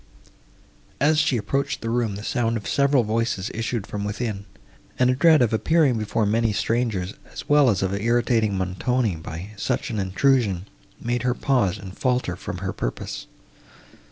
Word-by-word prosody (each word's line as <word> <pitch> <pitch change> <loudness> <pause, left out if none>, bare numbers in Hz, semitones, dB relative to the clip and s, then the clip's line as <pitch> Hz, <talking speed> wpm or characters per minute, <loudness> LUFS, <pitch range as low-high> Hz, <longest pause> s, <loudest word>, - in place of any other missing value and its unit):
As 150 +2 +3
she 150 -5 +2
approached 135 +6 -1
the 115 - -2
room, 115 -4 0
the 105 - -7
sound 115 0 0
of 105 - -7
several 140 -2 +3
voices 110 -3 -1
issued 115 -1 -2
from 105 -1 -5
within, 105 -1 -3 0.5
and 125 0 +4
a - - +1
dread 155 -1 +5
of 115 -2 +1
appearing 140 0 +3
before 110 +1 0
many 110 +2 +2
strangers, 110 -4 -1 0.2
as - - -8
well 145 -3 +5
as 100 -4 +1
of 95 0 0
irritating 115 -1 +1
Montoni 95 +3 0
by 80 +5 -7
such 125 +4 -2
an 110 - -2
intrusion, 100 -1 +1 0.3
made 120 +1 -1
her 125 0 0
pause 120 -10 +1
and 95 -1 -9
falter 125 -8 0
from - - -6
her - - -2
purpose. - - -5
115 Hz, 165 wpm, -24 LUFS, 100-125 Hz, 0.5 s, dread